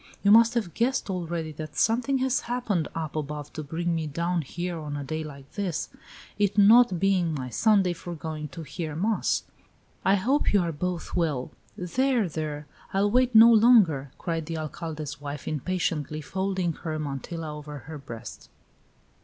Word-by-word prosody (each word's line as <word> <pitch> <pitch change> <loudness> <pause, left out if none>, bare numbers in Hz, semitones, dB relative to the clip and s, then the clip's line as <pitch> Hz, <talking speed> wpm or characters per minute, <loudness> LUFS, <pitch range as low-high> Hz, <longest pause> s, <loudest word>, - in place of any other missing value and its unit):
You 200 - +5
must 230 +2 +7
have 210 -8 -1
guessed 235 -3 0
already 170 -3 -3
that 155 +1 -8
something 250 +5 +2
has 260 0 +1
happened 230 -9 -1
up 160 -2 -4
above 150 -1 -4
to 155 - -5
bring 165 +4 -2
me 160 -1 -1
down 170 +4 -1
here 175 +4 -4
on 150 -2 -5
a 145 - -4
day 155 +3 -3
like 140 -2 -11
this, 190 -6 -3 0.5
it 205 0 +1
not 210 -2 +6
being 185 -4 +2
my 130 -3 -4
Sunday 195 - +3
for 175 0 -7
going 155 -1 -5
to 155 +4 -8
hear 155 +1 -5
mass. 210 +7 0 0.6
I 195 - +4
hope 250 +9 +1
you 200 - +5
are 170 -1 -1
both 175 +2 -4
well!" 155 -8 -1 0.3
"There! 240 +4 +1
there! 150 -2 -4 0.3
I'll 200 +1 +2
wait 250 0 +3
no 230 +1 +9
longer!" 210 - +5
cried 165 -3 -3
the 165 -1 -3
Alcalde's 155 -2 -5
wife, 145 -1 -6
impatiently, 155 -1 -2
folding 190 +1 -1
her 155 0 -4
mantilla 150 +2 -5
over 150 0 -8
her 160 -2 -7
breast. 115 -5 -9
170 Hz, 170 wpm, -27 LUFS, 150-200 Hz, 0.6 s, no